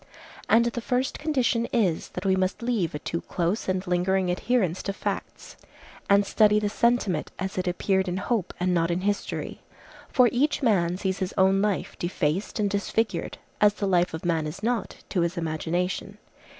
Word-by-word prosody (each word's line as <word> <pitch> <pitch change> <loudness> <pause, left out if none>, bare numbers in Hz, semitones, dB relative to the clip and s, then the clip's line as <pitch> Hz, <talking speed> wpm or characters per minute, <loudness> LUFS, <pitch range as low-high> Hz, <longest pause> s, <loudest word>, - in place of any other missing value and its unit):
And 230 +1 +5
the 235 0 -2
first 250 +3 -1
condition 255 -6 +1
is, 190 -9 +1
that 180 - -5
we 190 -1 +3
must 190 +4 -1
leave 220 -11 0
a - - 0
too 165 +3 -4
close 180 +4 -2
and 185 0 -1
lingering 180 +1 +1
adherence 185 -2 0
to 195 - -3
facts, - - -5 0.5
and 200 0 +5
study 210 +1 +4
the 210 -1 -1
sentiment 215 -7 +1
as 190 0 -4
it 185 0 -2
appeared 190 +2 +1
in 180 0 -2
hope 200 -1 -1
and 180 0 +1
not 165 -1 +2
in 175 +1 0
history. 205 +1 -3 0.5
For 250 -3 +5
each 290 +3 +1
man 180 -7 +2
sees 190 -1 -2
his 185 -1 -3
own 190 +1 +4
life 205 -2 -1
defaced 175 +3 -1
and 210 - +2
disfigured, 205 +3 -1 0.2
as 205 0 +5
the 205 - -2
life 180 -3 +2
of 160 - -8
man 165 -3 +1
is 180 +7 -8
not, 235 0 -1
to 180 - 0
his 170 +2 -1
imagination. 175 +5 -2
190 Hz, 180 wpm, -26 LUFS, 180-215 Hz, 0.5 s, And